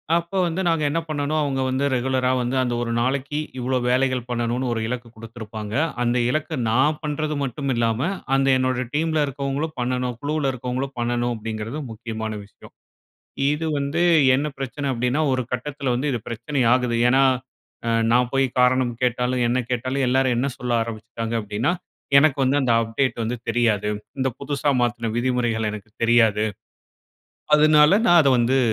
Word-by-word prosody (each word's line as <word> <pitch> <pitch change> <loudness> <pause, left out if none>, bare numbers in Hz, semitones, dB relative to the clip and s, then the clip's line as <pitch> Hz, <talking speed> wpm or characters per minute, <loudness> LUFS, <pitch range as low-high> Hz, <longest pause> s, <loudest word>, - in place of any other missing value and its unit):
அப்போ 170 +3 -2
வந்து 175 +3 -2
நாங்க 165 -2 +1
என்ன 165 +3 0
பண்ணணும், 150 0 -1
அவங்க 135 -2 -1
வந்து 130 +2 -1
ரெகுலரா 130 0 +1
வந்து 125 +2 -1
அந்த 120 -1 -1
ஒரு 115 - -2
நாளைக்கு 135 +4 -1 0.2
இவ்ளோ 130 +1 0
வேலைகள் 130 -1 +1
பண்ணணும்னு 120 +1 -1
ஒரு 115 - -2
இலக்கு 120 -1 -4
குடுத்துருப்பாங்க. 110 -2 -8 0.3
அந்த 120 +1 +1
இலக்க 155 +1 -2
நான் 135 +7 +2
பண்றது 150 0 -2
மட்டுமில்லாம, 120 -3 -1 0.3
அந்த 135 0 +2
என்னோட 130 -1 0
டீம்ல 155 0 +1
இருக்கவங்களும் 140 +3 -3
பண்ணணும். 125 0 -1
குழுவுல 145 -2 0
இருக்கவங்களும் 130 +2 -4
பண்ணணும் 120 0 0
அப்டீங்கிறது 110 +5 -5
முக்கியமான 110 -1 -5
விஷயம். 105 - -17 0.8
இது 155 +2 -2
வந்து 140 +5 -1 0.3
என்ன 145 +3 -1
பிரச்சனை 135 +2 -4
அப்டீன்னா, 125 +5 0
ஒரு 130 -1 0
கட்டத்துல 135 0 -2
வந்து 140 +4 -1
இது 120 - -1
பிரச்சனை 125 +4 -2
ஆகுது. 125 -2 +1
ஏன்னா, 135 +2 +4 0.6
அ - - +1 0.2
நான் 125 0 +3
போய் 135 0 +3
காரணம் 125 -1 +3
கேட்டாலும், 125 0 +1
என்ன 125 +1 +1
கேட்டாலும் 130 +2 -1
எல்லாரும் 130 -1 +2
என்ன 130 - +1
சொல்ல 125 -1 -2
ஆரம்பிச்சுட்டாங்க 115 0 -5
அப்டீன்னா, 105 +8 -1 0.5
"எனக்கு 150 -1 +3
வந்து 140 +3 +2
அந்த 120 -3 +2
அப்டேட் 115 +1 -1
வந்து 120 +2 -2
தெரியாது. 110 -3 +1 0.3
இந்த 130 0 +1
புதுசா 140 0 0
மாத்துன 115 -2 -1
விதிமுறைகள் 120 -3 0
எனக்கு 105 0 -9
தெரியாது. 115 -2 +4 1.1
அதனால 150 +1 +6
நான் 175 -1 +7
அத 140 - +3
வந்து 125 +3 +2
125 Hz, 155 wpm, -23 LUFS, 120-140 Hz, 1.1 s, நான்